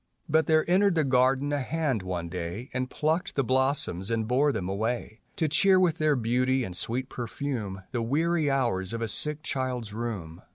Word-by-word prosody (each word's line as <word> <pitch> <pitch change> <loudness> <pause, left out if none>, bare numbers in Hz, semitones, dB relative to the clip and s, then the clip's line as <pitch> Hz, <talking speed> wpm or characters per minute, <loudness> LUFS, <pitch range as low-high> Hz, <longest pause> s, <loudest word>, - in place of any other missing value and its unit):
f3ut 160 0 +4
there 155 -1 +3
entered 190 +1 +4
the 160 - +3
garden 135 +2 +2
a 145 - +1
hand 140 -4 -1
one 90 -2 -4
day, 90 +7 -5
And 130 0 -2
plucked 160 +5 -1
the 135 - +2
blossoms 130 -7 +1
and 115 -1 0
bore 135 +5 +3
them 95 -9 -3
away 110 +2 -3
To 160 - +1
cheer 185 +6 +4
with 175 -3 +2
their 155 -1 +3
beauty 125 +2 +1
and 90 -5 -5
sweet 125 +7 -1
perfume 115 -6 -4
The 120 -3 -1
weary 155 +5 +1
hours 115 -8 0
of 115 0 -2
a - - -1
sick 150 +8 -3
child's 125 -6 -3
room. 105 -8 -5
130 Hz, 190 wpm, -27 LUFS, 110-150 Hz, -, f3ut